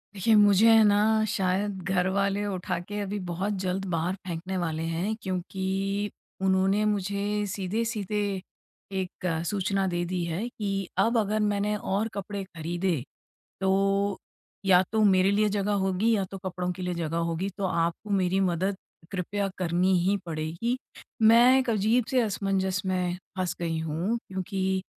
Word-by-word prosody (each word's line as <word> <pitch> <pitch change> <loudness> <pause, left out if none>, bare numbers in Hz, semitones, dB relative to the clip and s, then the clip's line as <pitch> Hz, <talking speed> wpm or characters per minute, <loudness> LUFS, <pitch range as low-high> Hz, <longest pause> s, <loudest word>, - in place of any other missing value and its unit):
देखिए 200 +4 +2
मुझे 205 +1 +6
है 225 -1 +7
ना 205 -1 +5 0.4
शायद 195 +2 0
घरवाले 195 +2 +1
उठा 185 -3 -2
के 205 0 -4
अभी 205 +1 -3
बहुत 190 +5 -1
जल्द 190 +1 -1
बाहर 170 +3 0
फेंकने 180 +2 -3
वाले 160 -2 -2
हैं 170 +6 -1
क्योंकि 190 +1 -2 0.3
उन्होंने 190 +2 +3
मुझे 205 0 0
सीधे-सीधे 210 +2 -2 0.8
एक 185 0 -7 0.2
सूचना 195 -1 0
दे 175 -1 -1
दी 180 0 -2
है 170 +7 -2
कि 205 -4 -3 0.3
अब 235 +1 +1
अगर 215 0 +1
मैंने 210 0 +1
और 205 +2 -1
कपड़े 200 0 -4
खरीदे, 175 -2 -2 0.6
तो 195 +1 +2 0.5
या 185 -1 +6
तो 220 0 +2
मेरे 190 -1 +4
लिए 210 +1 +3
जगह 205 0 0
होगी 195 +5 +2
या 195 -2 0
तो 195 - -5
कपड़ों 180 -1 -2
के 185 - -9
लिए 180 0 -1
जगह 165 -1 -2
होगी 180 +4 -2
तो 200 - -1
आपको 170 +3 -1
मेरी 185 +1 +1
मदद 190 +3 -1 0.3
कृपया 200 +2 -2
करनी 180 +1 +2
ही 200 - +2
पड़ेगी। 165 +9 -2 0.4
मैं 235 +4 +7
एक 260 -2 -1
अजीब 220 +2 +2
से 255 -1 +4
असमंजस 195 -3 0
में 180 -1 0 0.2
फँस 185 -1 -1
गई 165 -1 -1
हूँ 165 +8 -1
क्योंकि 190 0 -2
195 Hz, 150 wpm, -27 LUFS, 180-205 Hz, 0.8 s, है